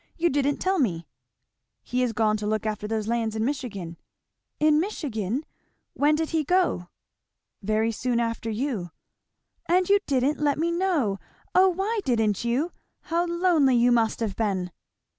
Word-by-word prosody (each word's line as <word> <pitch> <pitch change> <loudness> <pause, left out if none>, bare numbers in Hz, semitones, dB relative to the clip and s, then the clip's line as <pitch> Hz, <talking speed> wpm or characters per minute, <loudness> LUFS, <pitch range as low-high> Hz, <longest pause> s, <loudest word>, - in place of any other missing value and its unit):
you 345 0 +2
didn't 285 0 +1
tell 380 0 0
me." 170 - 0 0.8
"He 250 +1 -1
is 250 -2 +1
gone 215 -1 +2
to 210 0 -4
look 215 +1 -1
after 210 -1 -2
those 215 -1 -2
lands 225 -1 -1
in 220 0 0
Michigan." 210 - -4 0.6
"In 305 0 +4
Michigan! 275 - -2 0.5
When 295 +2 +3
did 320 0 -2
he 320 -2 +1
go?" 355 - +1 0.7
"Very 215 +2 +1
soon 240 +2 -1
after 230 -1 -2
you." 220 -5 -2 0.8
"And 360 +1 +3
you 405 0 +6
didn't 275 +1 +1
let 290 -1 +1
me 335 +2 0
know! 335 - 0 0.3
O 375 +1 +6
why 390 +5 -1
didn't 225 -6 +1
you? 255 +9 0 0.3
How 340 +1 -1
lonely 340 -6 +3
you 240 +1 +4
must 230 -1 +2
have 210 -4 -2
been." 190 -5 -1
250 Hz, 160 wpm, -25 LUFS, 215-320 Hz, 0.8 s, you